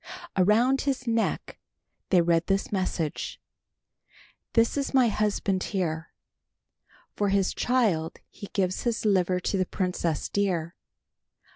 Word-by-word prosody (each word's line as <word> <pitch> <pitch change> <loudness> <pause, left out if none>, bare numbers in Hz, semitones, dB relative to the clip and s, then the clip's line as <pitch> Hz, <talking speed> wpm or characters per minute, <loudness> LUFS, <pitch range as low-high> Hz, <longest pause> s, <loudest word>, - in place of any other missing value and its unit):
Around 225 +8 +3
his 270 -2 -1
neck 230 -1 -1 0.5
they 180 -3 +5
read 170 0 +2
this 195 0 0
message, 185 -6 -2 1.1
"This 230 0 +3
is 280 -1 -2
my 250 -3 +5
husband 205 -2 0
here. 165 -5 -2 1.0
"For 205 -1 +1
his 195 -1 +1
child 205 -11 +1
he 200 - -10
gives 185 -2 0
his 230 -2 -1
liver 185 -3 +2
to 195 - -1
the 185 - +1
princess, 180 -4 -1
dear. 180 -4 -1
195 Hz, 120 wpm, -27 LUFS, 180-225 Hz, 1.1 s, they